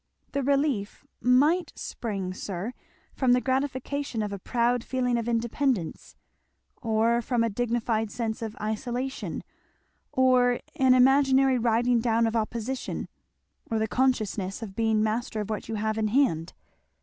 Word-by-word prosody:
"The 280 - -1
relief 275 -6 0 0.2
might 295 +7 +3
spring, 195 -5 -4
sir, 195 +4 -5 0.4
from 255 -2 +3
the 250 - +4
gratification 260 -2 -2
of 205 -1 -4
a 200 - -5
proud 240 +3 +1
feeling 250 -2 0
of 235 0 -1
independence, 235 - -1 0.7
or 230 +1 +2
from 240 0 0
a 230 - 0
dignified 230 -1 0
sense 225 0 -3
of 220 -1 -5
isolation, 240 +5 -3 0.7
or 250 -1 +3 0.2
an 260 -3 +5
imaginary 265 0 +4
riding 235 +1 +2
down 230 0 +2
of 225 0 -1
opposition 230 +3 -3 0.6
or 225 - 0
the 220 0 0
consciousness 220 -6 0
of 195 -3 -8
being 220 -1 +2
master 220 0 -1
of 210 +1 -5
what 215 - -4
you 225 - -2
have 215 +1 -1
in 215 - +1
hand." 210 - +1
235 Hz, 140 wpm, -27 LUFS, 220-255 Hz, 0.7 s, an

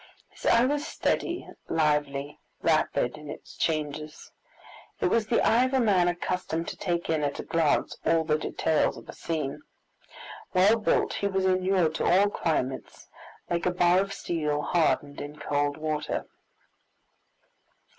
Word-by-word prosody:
His - - -7
eye 235 +1 +5
was 290 +3 -1
steady, 350 +1 -1 0.2
lively, 150 -2 0 0.2
rapid 125 +5 +1
in 150 -1 -10
its - - -10
changes. 155 -1 -3 0.7
It - - +2
was 225 -2 +1
the 230 - +2
eye 235 +3 +4
of 260 +1 -1
a - - +4
man 195 -7 +3
accustomed 175 -1 -2
to - - -6
take 170 -2 -2
in 160 -2 +1
at 145 -1 -1
a - - -3
glance 165 -3 +1
all 165 -1 +3
the 155 -1 +1
details 155 0 0
of - - -12
a - - -8
scene. 155 -5 -3 0.9
Well 200 +5 +5
built, 220 - +1
he 200 - -1
was 190 -1 0
inured 185 -3 +2
to - - -1
all 200 +3 +4
climates, 135 -8 -3 0.4
like 170 +1 -1
a - - +2
bar 175 0 +4
of 195 0 -1
steel 150 -6 -2
hardened 145 -4 +1
in 145 +1 -7
cold 145 0 -1
water. 155 -1 -2
165 Hz, 155 wpm, -27 LUFS, 150-190 Hz, 0.9 s, eye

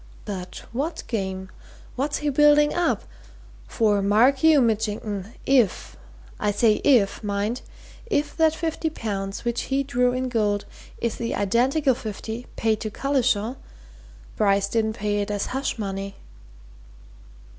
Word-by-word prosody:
"But 185 -3 -6
what 285 +8 -3
game? 190 -4 -3 0.4
What's 280 +3 -1
he - - +3
building 295 +1 +5
up? 350 0 +1 0.6
For 210 -3 +2
mark 230 +7 +4
you, 320 -2 +7
Mitchington, 215 -3 -1
if 250 -8 +2 0.4
I 210 - +1
say 210 +1 +3
if, 235 -8 +3
mind! 205 +4 -1 0.5
if 300 -10 0
that 320 -1 +4
fifty 325 -1 -2
pounds 200 -7 -4
which 235 0 0
he 275 +1 +1
drew 250 -2 +1
in 255 +1 -1
gold 210 -4 0 0.3
is 235 - -2
the 235 -1 -2
identical 260 +8 +2
fifty 225 0 -6
paid 220 -1 +1
to 215 - -3
Collishaw, 255 -2 0 0.8
Bryce 200 -2 +3
didn't 220 0 0
pay 210 -2 -1
it 205 - -3
as 205 -1 -1
hush 270 -1 -2
money!" 195 -1 -4
230 Hz, 135 wpm, -24 LUFS, 205-270 Hz, 0.8 s, you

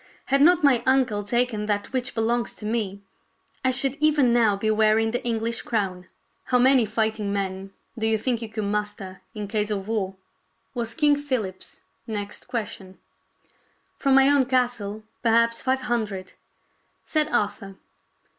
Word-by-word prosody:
Had 275 - +5
not 345 +2 +5
my 265 -5 +5
uncle 255 -6 +2
taken 225 -1 0
that 205 +2 -2
which 255 -1 -2
belongs 235 +1 0
to 210 - -9
me, 210 -3 -2 0.6
I 260 - +3
should 265 +1 +1
even 295 -5 +3
now 225 -4 +4
be 215 +2 0
wearing 220 +1 +3
the 245 - -2
English 230 0 -1
crown." 190 -5 -2 0.2
" - - -45
How 250 - +2
many 255 -2 +5
fighting 220 -1 -1
men 195 -1 -3 0.2
do 220 -1 -1
you 220 0 +2
think 235 +1 -1
you 225 - -5
could 215 0 -4
muster 205 -2 -3
in 210 -1 -4
case 210 0 -1
of 200 -2 -3
war.?" 200 -4 -2 0.6
was 235 -2 -4
King 295 -2 +4
Philip's 250 -10 -4 0.3
next 210 -2 -5
question. 205 -5 -5 1.0
"From 275 -2 +3
my 270 0 +6
own 285 -2 +4
castle, 240 -5 -1 0.2
perhaps 230 0 +3
five 265 0 0
hundred," 215 -7 -3 0.7
said 305 -1 +1
Arthur. 200 -7 -2
225 Hz, 155 wpm, -24 LUFS, 205-250 Hz, 1.0 s, my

